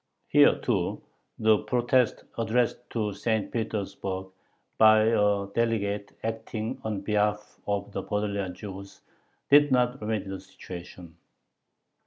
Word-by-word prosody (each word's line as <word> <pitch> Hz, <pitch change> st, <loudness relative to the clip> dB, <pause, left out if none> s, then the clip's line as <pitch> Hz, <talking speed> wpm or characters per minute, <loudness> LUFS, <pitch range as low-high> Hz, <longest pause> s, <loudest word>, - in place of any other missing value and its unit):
Here, -, -, +6 dB
too, -, -, -1 dB, 0.4 s
the 110 Hz, -1 st, +4 dB
protest 125 Hz, -1 st, +1 dB
addressed 120 Hz, +1 st, 0 dB
to 105 Hz, -3 st, -2 dB
St. 110 Hz, 0 st, -1 dB
Petersburg 100 Hz, -4 st, -3 dB, 0.5 s
by 110 Hz, 0 st, +7 dB
a 105 Hz, -3 st, +2 dB
delegate 105 Hz, -3 st, -1 dB
acting 110 Hz, 0 st, -4 dB
on 105 Hz, -3 st, -3 dB
behalf 105 Hz, 0 st, -1 dB
of 100 Hz, 0 st, -2 dB
the -, -, -3 dB
Podolian 100 Hz, -3 st, -2 dB
Jews 100 Hz, 0 st, -9 dB, 0.5 s
did 145 Hz, 0 st, +7 dB
not 125 Hz, +1 st, +2 dB
remedy 105 Hz, -2 st, -2 dB
the 95 Hz, 0 st, -5 dB
situation. 90 Hz, -2 st, -11 dB
105 Hz, 115 wpm, -27 LUFS, 100-115 Hz, 0.5 s, by